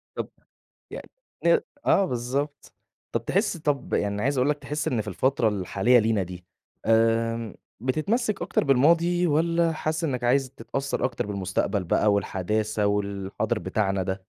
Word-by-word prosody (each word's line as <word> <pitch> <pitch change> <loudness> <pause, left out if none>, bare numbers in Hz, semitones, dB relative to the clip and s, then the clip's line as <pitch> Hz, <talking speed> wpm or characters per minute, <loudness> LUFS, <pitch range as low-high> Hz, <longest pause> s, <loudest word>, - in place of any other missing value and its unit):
طَب - - -4 0.6
يعني - - -8 0.4
ن 170 - +6 0.3
آه 195 - +4
بالضبط. 135 +1 -3 0.4
طَب 115 0 -1
تحِس 195 - +1
طَب 145 -4 -2
يعني 100 0 0
عايز 140 +1 +1
أقول 130 +3 +3
لك، 150 - -1
تحِس 150 +2 -3
إن 120 - 0
في 105 - -5
الفترة 115 +3 +1
الحالية 105 +4 +2
لينا 110 -2 +2
دي، 90 0 -8 0.4
آمم 115 -1 +2 0.3
بتتمسِّك 195 - 0
أكتر - - 0
بالماضي 170 +6 +3
والّا 165 +2 +2
حاسِس 155 +1 -2
إنّك 125 -5 -2
عايز 130 +2 +2
تتأثّر 135 +1 -3
أكتر 125 -5 -1
بالمستقبل 100 0 -1
بقى 105 +5 +2
والحداثة 105 +2 0
والحاضر 100 0 -1
بتاعنا 95 +2 -1
ده؟ 95 +1 -2
120 Hz, 145 wpm, -25 LUFS, 105-150 Hz, 0.6 s, ن